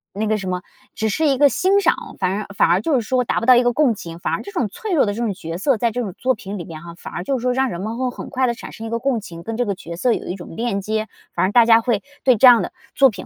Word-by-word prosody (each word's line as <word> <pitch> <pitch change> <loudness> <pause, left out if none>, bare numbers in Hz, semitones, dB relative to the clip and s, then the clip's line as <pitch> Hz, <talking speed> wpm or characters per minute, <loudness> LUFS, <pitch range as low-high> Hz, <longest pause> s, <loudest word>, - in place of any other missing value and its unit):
那 215 +2 -1
个 215 0 +1
什 195 - -6
么 180 0 -2 0.3
只 220 - -1
是 310 +9 +1
一 275 -2 +2
个 285 0 +6
欣 390 +6 +2
赏， 345 - 0
反 185 -1 +1
而 210 - -5
反 - - +3
而 175 +3 +3
就 315 - 0
是 250 - +2
说 250 +3 0
达 - - 0
不 - - -4
到 255 - +8
一 245 - +5
个 245 0 +2
共 265 -4 +3
情， 165 -3 -9
反 - - -2
而 - - -1
这 400 - -9
种 255 - -1
脆 415 - -5
弱 300 - +4
的 205 - -1
这 230 - -4
种 225 -4 0
角 165 -2 -6
色 245 +6 +1
在 235 +2 +1
这 245 - -2
种 200 -6 -4
作 260 0 +1
品 205 -1 -7
里 170 - -6
面 155 -2 -9
哈， 170 0 -10
反 - - -10
而 175 - -4
就 265 +7 -1
是 - - -6
说 250 +1 +1
让 265 +1 +1
人 175 -5 -5
们 220 +3 -4
会 255 0 0
很 - - -8
快 260 0 0
地 240 - +1
产 230 - -10
生 225 - -8
一 - - -5
个 230 - -1
共 265 -2 0
情， 170 -4 -10
跟 225 +4 -5
这 245 - +1
个 205 - -1
角 170 -2 -8
色 235 +7 +2
有 - - -4
一 180 - -3
种 175 -3 -10
链 225 -2 -1
接， 215 +2 -2 0.3
反 - - +1
而 190 - 0
大 235 +1 +6
家 225 0 +6
会 225 -3 0 0.2
对 255 -2 +5
这 240 - +6
样 240 -2 +8
的 - - -4 0.2
作 270 -1 +6
品 195 -5 -8
225 Hz, 370 characters per minute, -20 LUFS, 195-255 Hz, 0.3 s, 到